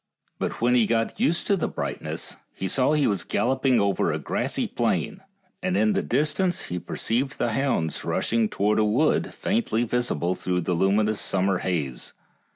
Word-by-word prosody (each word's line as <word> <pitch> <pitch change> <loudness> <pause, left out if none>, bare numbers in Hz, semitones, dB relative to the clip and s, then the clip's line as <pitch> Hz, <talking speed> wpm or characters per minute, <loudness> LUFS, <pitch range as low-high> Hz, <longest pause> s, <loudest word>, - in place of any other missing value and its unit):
But - - -3
when 120 +1 +3
he 120 -4 +4
got 115 - 0
used 175 -8 +1
to 200 - +3
the 185 - -1
brightness - - -4 0.2
he 95 - -3
saw 130 +9 +2
he 150 -2 +3
was 100 -4 0
gal 120 - 0
loping 130 -1 +2
over 100 -1 +1
a - - -1
grassy - - -1
plain, 190 - -1 0.4
and 180 0 0
in 215 - +3
the 200 - +1
distance 155 +7 0
he 90 - -4
perceived 125 +9 -2
the 120 - 0
hounds 110 - 0
rushing 115 -2 0
towards 105 +2 +1
a - - +4
wood 115 +9 +2
faintly 195 - 0
visible 115 -8 0
through 90 -1 -2
a - - +1
luminous 105 +4 +2
summer 95 -1 +1
haze. 75 -10 -3
115 Hz, 175 wpm, -25 LUFS, 95-140 Hz, 0.4 s, he